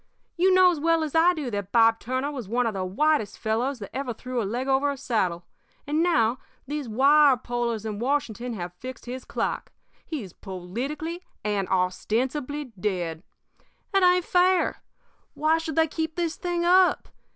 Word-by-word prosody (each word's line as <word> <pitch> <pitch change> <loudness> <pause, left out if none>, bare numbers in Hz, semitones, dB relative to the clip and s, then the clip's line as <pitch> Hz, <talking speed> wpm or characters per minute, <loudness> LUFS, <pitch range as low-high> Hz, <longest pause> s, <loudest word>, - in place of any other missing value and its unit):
You 370 +2 +3
know 370 -1 +6
as 330 - -3
well 330 +1 +2
as 305 - -4
I 345 +2 +5
do 285 -6 -4
that 200 -2 -4
Bob 225 -1 +5
Turner 260 +4 -2
was 255 -8 -6
one 245 +2 +1
of 225 - 0
the 190 -1 -2
whitest 220 +4 +1
fellows 240 +5 -1
that 205 -4 -9
ever 260 -3 -3
threw 250 +1 -3
a - - -2
leg 245 +6 -3
over 270 +1 +2
a 280 - -3
saddle, 185 -10 -1 0.4
and 300 +2 0
now 255 -8 +2 0.3
these 290 -1 -4
wirepullers 245 -3 +3
in 210 -2 -4
Washington 245 -2 -1
have 180 -4 -5
fixed 255 +8 -9
his 250 +1 -6
clock. - - -3 0.3
He's 240 - -6
politically 260 - -5 0.2
and 205 -3 -1
ostensibly 250 +10 -1
dead. 175 -5 -2 0.7
It 390 - +4
ain't 360 -1 +4
fair. 365 0 +2 0.5
Why 315 +2 +2
should 320 -2 -5
they 320 - +4
keep 320 +1 -3
this 340 -2 -1
thing 350 -1 -2
up? 365 +1 +4
260 Hz, 170 wpm, -26 LUFS, 220-315 Hz, 0.7 s, know